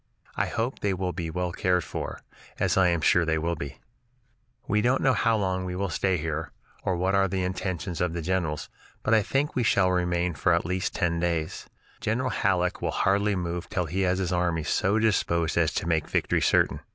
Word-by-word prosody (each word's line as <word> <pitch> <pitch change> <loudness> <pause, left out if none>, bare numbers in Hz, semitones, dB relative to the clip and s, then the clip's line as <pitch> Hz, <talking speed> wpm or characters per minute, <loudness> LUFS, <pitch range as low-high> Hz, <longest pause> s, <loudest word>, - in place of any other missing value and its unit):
I - - 0
hope 120 +3 -2
they 100 -2 0
will 90 0 -2
be 85 -3 -4
well 90 +2 -2
cared 90 0 +1
for, - - -5 0.4
as - - +2
I 95 -1 +5
am 85 -2 +1
sure 90 +3 +4
they 80 -1 +1
will 85 +2 -1
be. 70 -4 -7 0.9
"We 105 +1 +2
don't 125 +4 +2
know 130 - +4
how 115 -2 +2
long 95 -2 -1
we 90 0 -4
will 100 0 -2
stay 95 +3 +1
here, 80 0 -3 0.3
or 95 - 0
what 95 +2 +1
are 95 0 +4
the 95 0 -1
intentions 90 -2 -3
of 90 -2 0
the 85 - -3
generals; 85 -4 -1 0.4
but 110 - +2
I 110 - +6
think 135 +8 0
we 125 - +2
shall 95 -5 +3
remain 90 -1 0
for 85 +3 +2
at 85 - -1
least 95 +1 -2
ten 85 -2 0
days. 85 -2 -2 0.3
General 120 +4 -1
Halleck 90 -3 0
will - - 0
hardly 100 +1 +2
move 85 -1 -3
till 90 - -1
he 90 +5 -2
has 90 -1 +2
his 95 -2 -1
army 85 -2 0
so 95 +7 +1
disposed 85 -6 +1
as 80 -2 +2
to - - -2
make 80 -3 +1
victory - - +1
certain. - - +3
90 Hz, 210 wpm, -27 LUFS, 85-95 Hz, 0.9 s, I